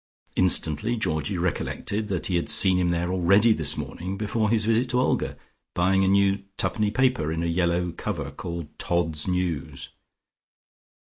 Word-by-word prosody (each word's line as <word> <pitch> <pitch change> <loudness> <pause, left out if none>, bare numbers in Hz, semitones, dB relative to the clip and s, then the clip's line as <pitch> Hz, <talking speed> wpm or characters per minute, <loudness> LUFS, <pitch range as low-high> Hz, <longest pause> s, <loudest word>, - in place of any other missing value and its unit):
Instantly 95 +4 +3
Georgie 95 -2 -2
recollected 100 +4 -2
that 95 -4 -3
he 90 - -1
had 85 - -1
seen 95 -2 +4
him 90 -1 +1
there 85 +1 -1
already 100 +5 +4
this - - +2
morning 95 +3 -5
before 110 +1 -1
his 110 -1 +1
visit 115 +3 +1
to 125 0 +1
Olga, 130 - -1 0.4
buying 95 +2 +2
a - - +2
new 100 0 +2 0.2
twopenny 105 -1 0
paper 125 - 0
in 80 +1 -2
a - - -1
yellow 85 +1 0
cover 80 -5 -5
called 85 0 -8
"Todd's 80 -3 +1
News." 90 -6 -3
90 Hz, 160 wpm, -25 LUFS, 85-105 Hz, 0.4 s, seen